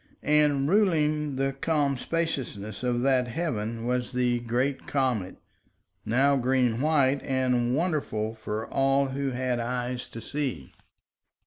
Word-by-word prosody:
And 145 -2 +3
ruling 155 -6 +2
the 135 +1 0
calm 145 0 0
spaciousness 130 -10 -3
of 120 -1 0
that 130 -2 +3
heaven 115 -6 -3
was 125 +1 -1
the 125 -1 +1
great 125 +4 -1
comet, 125 -9 -1 0.7
now 135 +5 +3
green 125 -2 +1
white, 140 -3 +3
and 125 -2 +1
wonderful 140 -10 -1
for 110 0 -5
all 135 0 +2
who 135 +1 -2
had 125 -1 -1
eyes 125 +1 -3
to 115 - -9
see. 125 - -4
130 Hz, 125 wpm, -27 LUFS, 120-140 Hz, 0.7 s, And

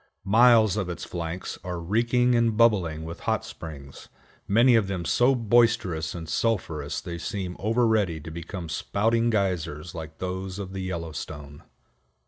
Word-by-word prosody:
Miles 110 -1 +5
of 95 -4 -2
its 90 - -5
flanks 85 +1 -5
are 90 -1 -4
reeking 120 +7 +2
and 115 -2 +2
bubbling 90 -9 +3
with 85 +1 -7
hot - - 0
springs, 70 -4 -10 0.4
many 120 +5 +5
of 110 -4 +3
them 95 -3 -3
so 125 +8 +3
boisterous 115 -9 +2
and 80 -2 -6
sulphurous 80 -7 -1
they 85 +1 -6
seem 90 +1 -4
over 115 +4 +2
ready 105 -8 +1
to 80 +1 -8
become 85 +2 -6
spouting 115 +8 0
geysers 85 -7 -1
like 80 -1 -8
those 95 +1 -4
of 95 -2 -6
the 95 - -4
Yellowstone. 80 -5 -6
95 Hz, 150 wpm, -26 LUFS, 80-115 Hz, 0.4 s, Miles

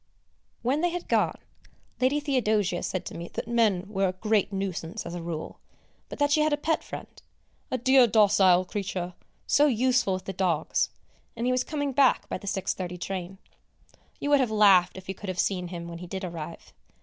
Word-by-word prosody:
When 270 +6 +1
they 350 - +2
had 350 0 -5
gone, - - +1 0.6
Lady 265 +3 +2
Theodosia 220 - +1
said 185 -1 -3
to - - -7
me 170 +1 -6
that - - -4
men 225 -6 +2
were 195 -2 0
a 185 - -2
great 210 +1 +1
nuisance 195 0 -4
as 170 - -6
a 175 - -5
rule, 165 -2 -6 0.5
but - - -7
that 290 0 +2
she 305 - +4
had 305 0 +2
a 295 - +2
pet 320 +2 0
friend, - - -9 0.5
a 255 - -1
"dear 260 0 +5
docile 200 -4 +5
creature, 185 -2 -4 0.3
so 295 +1 +4
useful 250 -4 +2
with 185 0 -7
the 195 - -4
dogs," 175 -4 0 0.5
and 235 +1 -3
he 250 - +2
was 255 0 +1
coming 285 -1 -2
back 265 0 +3
by - - -3
the 200 - -11
6.30 185 -2 -3
train. 190 +1 -5 0.8
You 290 - -2
would 285 - +6
have 255 -4 +2
laughed, 195 -4 +5
if 190 - -10
you 190 - -3
could 195 +1 -8
have 185 - -4
seen 180 -2 0
him 170 -1 -7
when 170 0 -7
he 180 - -8
did 190 +2 -5
arrive! 170 -2 -8
200 Hz, 200 wpm, -27 LUFS, 180-255 Hz, 0.8 s, would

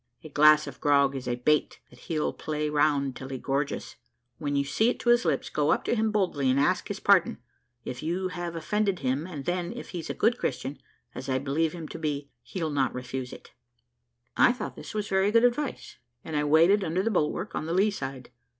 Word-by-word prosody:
"A 155 - -9
glass 150 +1 +6
of - - -10
grog 140 -2 +3
is 130 -2 -5
a 120 - 0
bait 150 +5 +1
that - - -17
he'll 155 -4 -2
play 150 -1 -3
round 145 -3 +2
till 135 +1 -8
he 135 - -4
gorges. 140 +2 -3 0.4
When 145 -1 -2
you 140 - +2
see 220 +11 +2
it - - -2
to 240 - 0
his 240 +1 +4
lips, - - 0
go - - +1
up - - +1
to - - 0
him 220 -1 +1
boldly, 180 -10 +1
and 130 +2 +3
ask 145 - +1
his - - -4
pardon, - - +4 0.5
if 125 - -5
you 180 +4 -2
have 175 -1 -5
offended 195 +2 -1
him, 135 +5 -1
and 150 -7 -7
then, 175 0 -1
if 240 - -8
he's 170 -3 -5
a - - -3
good 235 +3 +2
Christian, 140 +2 -3 0.3
as 135 - -7
I 130 - +2
believe 145 +4 0
him 165 -3 -7
to - - -7
be, 145 -2 -3
he'll 165 -5 -4
not 135 -3 0
refuse 125 0 -5
it." - - -12 0.8
I 240 - +5
thought 250 - -6
this - - -9
was 210 -1 -2
very 190 +1 +2
good 230 +1 +4
advice, 250 +3 -1 0.3
and 160 - -5
I 150 0 +1
waited 165 +7 +5
under 180 +2 0
the 225 - 0
bulwark 180 +2 -1
on 155 - -3
the 165 - -1
lee 200 +3 +3
side. 135 -8 -6
155 Hz, 225 wpm, -27 LUFS, 140-190 Hz, 0.8 s, glass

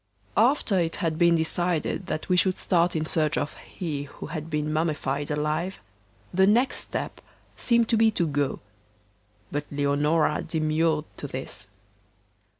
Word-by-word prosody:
After 225 -4 +3
it 165 -1 0
had 165 -4 -1
been 170 -1 +5
decided 175 +2 0
that 155 - -3
we 180 - +3
should 185 +1 +3
start 175 -2 +2
in 155 0 0
search 155 -1 +1
of 145 - -1
'He 150 -6 -5
who 140 - -9
had 160 0 -5
been 150 -1 -1
mummified 150 -3 -1
alive,' 155 +5 -1 0.6
the 190 +2 +4
next 240 +6 +3
step - - -4 0.3
seemed 235 -2 +2
to 230 - +3
be 225 0 +5
to 180 -5 0
go. 145 -3 -1 0.9
But 145 0 -2
Leonora 145 +2 +1
demurred 155 -1 +1
to 145 - -4
this. 115 -7 -5
160 Hz, 150 wpm, -26 LUFS, 150-180 Hz, 0.9 s, been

